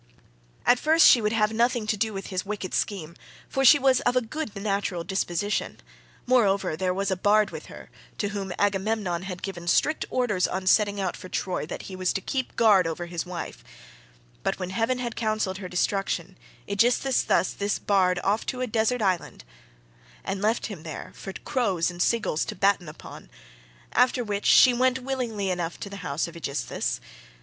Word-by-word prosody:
"At 245 - +5
first 320 +2 +5
she 240 - +7
would 210 0 +1
have 220 -1 +1
nothing 235 0 +1
to 215 - 0
do 220 +2 0
with 195 -1 -6
his 185 - -1
wicked 200 -2 -5
scheme, 170 -5 -2 0.3
for 270 - -1
she 270 +3 +8
was 265 -2 +3
of 245 +1 0
a 255 - +4
good 230 -1 -5
natural 195 -4 -1
disposition;30 190 +2 -2 0.5
moreover 200 -9 +2
there 185 +3 0
was 195 +2 -1
a - - +2
bard 205 +3 +3
with - - -8
her, - - -12 0.3
to 205 - -1
whom 200 -2 -4
Agamemnon 200 -3 0
had 185 -1 -7
given 175 -3 -6
strict 310 - +2
orders 220 -8 +1
on 190 0 -4
setting 205 +1 +3
out 190 -2 -1
for 185 - -10
Troy, 180 -5 -2
that - - -6
he 190 - -8
was 185 -1 0
to - - -1
keep 260 +5 -3
guard 205 -6 +5
over 165 +1 -4
his 170 0 -5
wife; 180 -1 -6 0.8
but - - -1
when 185 -1 -5
heaven 225 +5 0
had 240 -2 -4
counselled 215 -4 -1
her 185 -3 -6
destruction, 185 0 -1 0.3
Aegisthus 245 +6 +2
carried - - +2
this 200 0 0
bard 185 -3 +2
off 205 +3 +1
to 255 -1 -3
a - - +1
desert 225 +1 0
island 185 - -1 0.8
and 195 - -3
left 220 +3 +1
him 200 -7 -6
there 160 -2 -7
for 195 - -8
crows 195 - 0
and 175 0 -6
seagulls 210 -7 +1
to - - -5
batten 195 -3 +2
upon—after - - -3
which 205 -2 -2
she 255 - +7
went 255 +1 +2
willingly 245 -7 -2
enough 175 -2 -3
to 200 - -7
the 200 - -7
house 140 -4 -2
of 170 - -11
Aegisthus. 150 -4 -3
200 Hz, 185 wpm, -26 LUFS, 180-230 Hz, 0.8 s, she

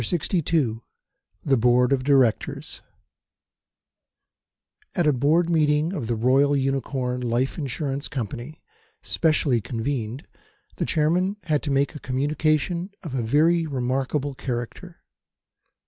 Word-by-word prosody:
CHAPTER 175 - -1
LXII 140 -8 0 0.7
THE 135 -2 +3
BOARD 125 +2 +4
OF 130 -2 0
DIRECTORS 135 -5 +1 2.1
AT 175 - +2
a 150 - +4
Board 150 +7 +2
Meeting 155 0 +2
of 120 - -4
the 120 - 0
Royal 135 +5 +3
Unicorn 130 -2 -1
Life 125 +5 -1
Insurance 140 0 -3
Company, 125 - -6 0.4
specially 150 -7 +1
convened, 120 +2 -4 0.5
the - - -1
Chairman 175 +6 +1
had 155 -4 0
to 145 - -4
make 140 +2 +1
a 150 - -8
communication 155 +6 0
of 160 -7 -6
a 130 - 0
very 160 +8 +3
remarkable 135 +1 -1
character. 120 -3 -6
140 Hz, 115 wpm, -24 LUFS, 125-155 Hz, 2.1 s, BOARD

